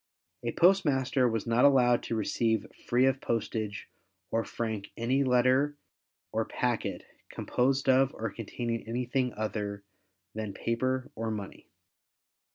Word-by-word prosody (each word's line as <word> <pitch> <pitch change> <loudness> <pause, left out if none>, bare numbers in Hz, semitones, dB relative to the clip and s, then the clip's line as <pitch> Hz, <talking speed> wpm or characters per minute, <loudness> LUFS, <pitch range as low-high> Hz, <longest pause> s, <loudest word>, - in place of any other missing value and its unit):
A - - -1
postmaster 135 -8 +3
was 115 -2 -2
not 115 +1 +2
allowed 125 -4 +5
to 115 - -3
receive 110 0 0 0.2
free 125 +2 +4
of 135 0 +1
postage, 110 -2 -2 0.4
or 115 - +1
frank 110 -4 -4
any 130 +4 +1
letter 130 +3 +3 0.6
or - - 0
packet, - - -2 0.3
composed 135 +2 0
of, 135 0 +5
or 110 -2 -3
containing 115 +1 -4
anything 125 +2 -1
other 105 -2 -3 0.5
than 110 -2 -5
paper 130 +4 -1
or 115 0 -3
money. 105 -3 -6
120 Hz, 125 wpm, -29 LUFS, 110-130 Hz, 0.6 s, allowed